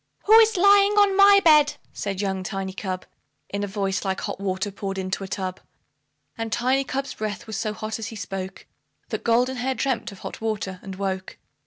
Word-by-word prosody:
"WHO 430 - +4
IS 445 -3 +4
LYING 400 +2 +6
ON 405 -2 +4
MY 400 0 +7
BED?" 300 -2 +6 0.2
said 200 -1 -3
young 190 -2 -1
Tiny 190 0 -4
Cub, 185 -1 -4 0.4
In 200 0 -3
a - - -1
voice 195 -1 -2
like 190 -1 -2
hot - - -4
water 195 +1 -2
poured 195 0 -5
into 190 +1 -3
a - - -5
tub. 185 -1 -4 0.8
And 225 -1 -4
Tiny 260 +4 +1
cub's 270 0 -3
breath 215 +1 -4
was 220 -2 -6
so 215 +2 -1
hot 215 +1 -5
as 220 - -4
he 225 - -8
spoke, 195 -2 -6 0.4
That - - -4
Goldenhair 250 +2 +1
dreamt 265 -5 -1
of 200 - -12
hot - - -7
water, 205 -4 -3
and 190 -1 -7
woke. 190 -1 -4
210 Hz, 195 wpm, -24 LUFS, 195-260 Hz, 0.8 s, MY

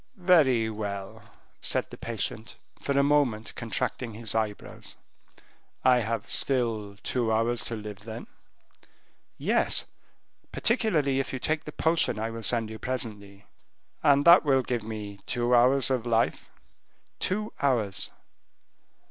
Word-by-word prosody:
"Very 155 - +4
well," 100 -3 -5 0.4
said - - -1
the - - -7
patient, 115 -1 -4 0.3
for 140 - -1
a 140 - +5
moment 140 -7 +1
contracting 115 0 -3
his 110 -1 -5
eyebrows, 110 -2 -4 0.9
"I 125 -1 +5
have 115 -1 -2
still 115 -6 -1
two 120 -3 0
hours 115 +2 +1
to 115 - -3
live 105 -2 -7
then?" 110 +2 -8 1.1
"Yes; - - +1 0.7
particularly 165 - +1
if 135 - -2
you - - -1
take 155 +4 -1
the 150 - -6
potion 160 -7 +2
I 110 +1 -2
will 115 0 -6
send 115 -1 -1
you 110 - -8
presently." 105 -6 -5 0.6
"And 145 -2 +4
that 170 +2 +9
will 135 -3 +3
give 120 -1 -2
me 105 -2 -7
two 120 0 +1
hours 130 +2 +4
of 125 -2 0
life?" 115 0 +1 0.7
"Two 210 +3 -1
hours." 115 -8 0
120 Hz, 130 wpm, -27 LUFS, 110-135 Hz, 1.1 s, that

